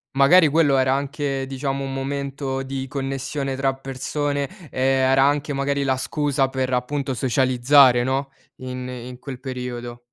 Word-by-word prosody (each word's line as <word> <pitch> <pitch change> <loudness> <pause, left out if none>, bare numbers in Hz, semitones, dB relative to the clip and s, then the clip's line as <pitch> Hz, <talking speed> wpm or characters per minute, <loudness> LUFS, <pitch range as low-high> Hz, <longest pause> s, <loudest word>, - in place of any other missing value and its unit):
Magari 160 +5 +6
quello 145 -2 +3
era 130 0 +3
anche 140 -1 -2
diciamo 135 +1 -3
un 135 0 -4
momento 135 0 -3
di 135 0 -5
connessione 135 0 -3
tra 135 0 0
persone, 140 +2 -3 0.2
ehm, 130 0 +2
era 135 0 +5
anche 145 +1 +1
magari 140 +1 0
la 130 -1 +1
scusa 140 0 0
per, 130 -1 -2
appunto, 135 +2 -1
socializzare 130 +1 +4
no, 135 +1 -1 0.3
in 125 0 -6
in 125 0 -8
quel 130 -2 -8
periodo. 125 -2 -6
135 Hz, 150 wpm, -22 LUFS, 130-140 Hz, 0.3 s, Magari